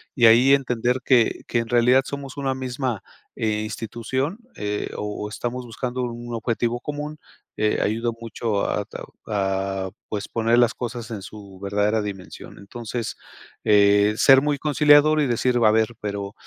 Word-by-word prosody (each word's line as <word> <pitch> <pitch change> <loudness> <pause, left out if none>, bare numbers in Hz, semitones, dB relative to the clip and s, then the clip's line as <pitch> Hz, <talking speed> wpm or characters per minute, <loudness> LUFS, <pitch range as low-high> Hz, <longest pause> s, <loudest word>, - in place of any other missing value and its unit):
y 120 - +4
ahí 125 +5 +7
entender 125 -1 -1
que 120 -4 +3
que 120 - 0
en 115 - -3
realidad 120 +2 +4
somos 140 -1 -6
una 135 -2 -1
misma, 130 -3 -3 0.3
eh, 105 -1 -1
institución, 120 - -3 0.2
eh, 105 0 -3
o 105 0 -4
o 105 - -5
estamos 120 +3 -4
buscando 125 +2 -4
un 120 -1 -5
objetivo 120 +1 -1
común, 150 +1 -5 0.4
eh, 105 0 +1
ayuda 115 +3 0
mucho 115 -2 -2
a 105 - -1
tao - - -10
a 95 -2 -1 0.2
pues, 105 -1 -4
poner 115 +1 +1
las 120 - +4
cosas 120 -2 -6
en 105 -3 -5
su 100 -2 -11
verdadera 105 +2 +1
dimensión. 100 -3 -8
Entonces, 115 +2 -5 0.5
eh, 105 0 +5
ser 135 -1 +7
muy 145 0 0
conciliador 150 +1 +5
y 145 - +1
decir, 125 +1 +1
a 110 - +6
ver, 110 +1 +1
pero, 100 -1 -4
115 Hz, 160 wpm, -23 LUFS, 105-130 Hz, 0.5 s, ahí